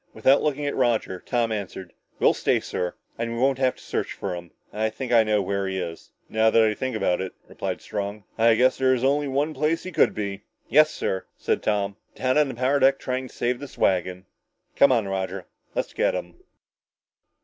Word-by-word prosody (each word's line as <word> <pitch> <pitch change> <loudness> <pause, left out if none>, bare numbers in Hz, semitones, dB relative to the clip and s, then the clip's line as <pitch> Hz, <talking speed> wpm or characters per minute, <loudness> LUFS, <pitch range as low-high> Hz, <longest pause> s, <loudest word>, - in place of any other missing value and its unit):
Without 135 +1 +4
looking 150 -1 -1
at 145 - -1
Roger, 115 -7 +1
Tom 120 +1 -1
answered, 95 -3 -5 0.2
"We'll - - +4
stay, - - +1
sir. 90 0 -3 0.2
And 115 0 -2
we - - -4
won't 135 +1 +2
have 130 -1 +2
to - - -16
search - - -3
for 95 - -4
him. 85 -1 -7 0.2
I 110 +1 0
think 125 +3 -6
I 115 -2 +6
know 105 -2 +1
where 100 +1 -1
he 95 0 -2
is." 85 -2 -6 0.2
"Now 110 0 +3
that 115 0 +5
I 110 -1 +3
think 130 +2 -3
about 95 -4 +1
it," 95 - -5
replied - - -4
Strong, 100 +1 -4
"I 115 0 +5
guess 130 +3 +3
there 130 0 +4
is 125 - -3
only 145 +2 +2
one 145 +3 0
place 150 +3 0
he 185 - -6
could 160 - +3
be." 100 -1 -4 0.3
"Yes, 155 +2 +6
sir," 95 -9 -3
said - - 0
Tom, 100 -1 -1 0.2
"down 130 +3 +2
on 150 - +4
the 130 - -6
power 130 +4 +2
deck 135 0 +5
trying 130 0 -3
to - - -17
save 120 +1 0
this 145 - -10
wagon! 90 0 +1 0.5
Come 140 - +6
on, 115 -5 +2
Roger! 95 -1 -3 0.3
Let's - - -2
get - - +1
him!" 90 -1 -5
115 Hz, 215 wpm, -25 LUFS, 100-130 Hz, 0.5 s, I